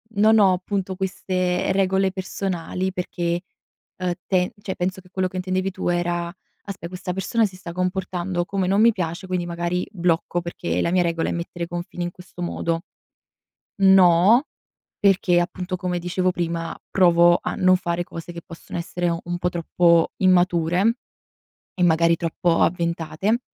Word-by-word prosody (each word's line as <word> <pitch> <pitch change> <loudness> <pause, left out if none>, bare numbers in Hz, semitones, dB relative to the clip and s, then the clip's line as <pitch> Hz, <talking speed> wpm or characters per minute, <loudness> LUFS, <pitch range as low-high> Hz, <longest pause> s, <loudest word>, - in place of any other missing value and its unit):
non 220 +2 +5
ho 195 -3 +5
appunto 190 +1 -3
queste 185 -1 -1
regole 190 0 +2
personali, 185 -1 -3
perché, 175 -1 -2 0.6
uhm, 180 -1 -1 0.2
te 180 -2 +1
cioè, 190 - -4
penso 185 +1 -2
che 180 - -21
quello 185 0 -1
che 185 - -7
intendevi 185 +1 -1
tu 185 - -4
era: 175 0 -1 0.3
“Aspe 190 -4 -7
questa 180 0 -5
persona 220 +5 +1
si 190 -3 -6
sta 180 -2 -8
comportando 180 0 -2
come 190 0 -1
non 200 +3 +3
mi 235 - +7
piace, 180 -2 -4
quindi 180 -1 -1
magari 175 +1 -2
blocco 175 -2 0
perché 90 - -3
la 170 - 0
mia 180 0 +3
regola 170 -1 -1
è - - -1
mettere 170 0 -4
i - - -14
confini 175 +1 -5
in 175 - -3
questo 180 0 -12
modo.” 170 -1 -2 1.0
No, 190 - +6 0.5
perché 195 -3 +3
appunto, 180 +1 -3
come 180 -1 -2
dicevo 180 +1 0
prima, 170 -1 -3
provo 175 -2 +5
a - - -2
non 185 0 +4
fare 175 -1 -2
cose 170 0 -8
che 170 - -7
possono 170 -1 -8
essere 175 +1 -2
un 175 +1 -3
po' 180 - 0
troppo 170 0 +2
immature 180 +2 +3 0.8
e 185 - -5
magari 170 0 +4
troppo 165 +1 0
avventate, 170 +5 0
180 Hz, 160 wpm, -23 LUFS, 170-185 Hz, 1.0 s, mi